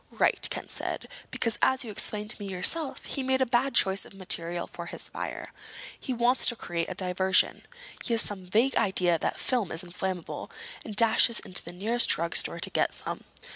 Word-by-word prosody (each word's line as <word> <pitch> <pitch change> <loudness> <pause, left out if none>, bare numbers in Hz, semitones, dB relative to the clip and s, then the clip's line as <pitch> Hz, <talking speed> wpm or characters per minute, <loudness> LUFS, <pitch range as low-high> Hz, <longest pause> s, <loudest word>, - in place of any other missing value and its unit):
"Right," - - +2
Ken - - -6
said. - - -5 0.2
"Because, 230 - -1
as 260 +1 +2
you 225 - -7
explained 210 0 -2
to 230 - -12
me 200 - -5
yourself, 265 - +1
he 275 - -4
made 260 0 +1
a 260 - +3
bad 250 +3 +1
choice 190 0 +3
of - - -12
material 175 -2 -2
for 170 0 -9
his - - -3
fire. - - -6 0.5
He - - -5
wants 245 +1 +3
to 240 - +1
create 170 -6 -3
a 185 - -5
diversion. 185 0 +2 0.4
He 235 - +1
has 225 - +8
some 190 -3 -4
vague 230 +8 +2
idea 180 -5 +2
that - - -2
film 240 -8 -1
is 160 - -2
inflammable, 180 0 -5 0.3
and 215 - -7
dashes 230 +1 +5
into 180 - +1
the 170 - -8
nearest 220 +7 +2
drugstore 170 +2 +1
to - - -3
get - - +1
some. - - -6
205 Hz, 195 wpm, -28 LUFS, 180-240 Hz, 0.5 s, has